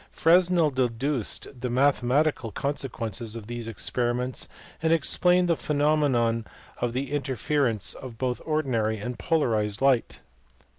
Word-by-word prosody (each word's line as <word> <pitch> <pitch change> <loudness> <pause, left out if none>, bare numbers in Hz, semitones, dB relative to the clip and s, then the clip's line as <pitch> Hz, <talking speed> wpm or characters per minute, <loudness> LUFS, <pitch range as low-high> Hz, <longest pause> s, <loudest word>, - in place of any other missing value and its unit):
Fresnel 170 -2 +4
deduced 130 0 -1 0.2
the 125 - -2
mathematical 135 0 +2
consequences 115 -4 -4
of 115 -3 -7
these 120 0 -6
ex 115 -4 -3
periments, 125 +1 -1 0.3
and 160 0 +2
explained 180 +3 +3
the 170 - +3
phenomena 145 -7 +1 0.4
of 120 0 -1
interference 135 -4 -1 0.2
both 125 0 -2
of - - -16
ordinary 125 -9 0
and 120 +3 -5
polarized 110 -7 +1
light. 135 -3 +2
130 Hz, 115 wpm, -26 LUFS, 115-150 Hz, 0.4 s, Fresnel